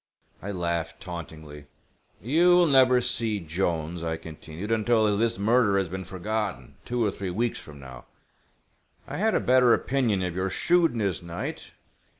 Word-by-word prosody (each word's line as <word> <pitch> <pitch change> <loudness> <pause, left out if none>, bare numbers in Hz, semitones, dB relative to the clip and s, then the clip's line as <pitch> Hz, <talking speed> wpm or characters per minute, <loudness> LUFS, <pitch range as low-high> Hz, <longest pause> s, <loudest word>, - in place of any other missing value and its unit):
I 100 - -6
laughed, 85 -3 -3
tauntingly. 80 -5 -9 0.6
"You 170 +9 +4
will 175 -1 +5
never 130 -4 +5
see 115 -3 0
Jolnes," 85 -1 -2
I 80 -1 -2
continued, 80 +5 -8
"until 110 -1 +2
this 115 +1 0
murder 105 0 +3
has 95 -3 0
been 95 +1 -5
forgotten, 95 - -4
two 120 -1 0
or 105 - +1
three 95 -2 -5
weeks 115 +6 -1
from 75 -2 -12
now. 65 -2 -11 1.0
I 145 +1 -5
had 220 +4 +1
a - - +3
better 125 -1 +5
opinion 120 -8 0
of 90 -2 -3
your 95 +1 -1
shrewdness, 120 - +1
Knight. 85 0 -6
100 Hz, 155 wpm, -26 LUFS, 85-120 Hz, 1.0 s, will